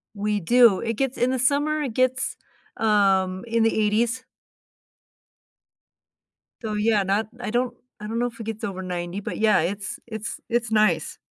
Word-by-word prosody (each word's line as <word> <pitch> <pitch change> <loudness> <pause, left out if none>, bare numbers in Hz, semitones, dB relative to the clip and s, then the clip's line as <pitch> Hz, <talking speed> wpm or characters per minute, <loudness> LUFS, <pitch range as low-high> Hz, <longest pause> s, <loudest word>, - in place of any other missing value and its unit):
We 210 0 -1
do. 235 +2 +5
It 230 0 -2
gets 265 +3 -2
in 250 +1 +2
the 260 - -1
summer, 290 +4 +2
it 260 -6 -3
gets, 255 +1 +1 0.4
um, 195 -3 +2
in 230 0 +1
the 225 - +2
80s. 230 +4 +1 2.4
Though, 215 -1 -3
yeah, 210 -1 +2
not 200 +3 0
I 245 -3 -4
don't 245 0 0 0.2
I 210 - -7
don't 230 +2 -2
know 245 - +1
if 235 -1 -11
it 225 - -5
gets 225 0 -5
over 190 -3 -4
90, 180 +1 -4
but, - - -5
yeah, 215 -2 +4
it's 200 +5 -3
it's 220 0 -5
it's 235 -1 0
nice. 215 -1 +2
220 Hz, 170 wpm, -24 LUFS, 205-240 Hz, 2.4 s, do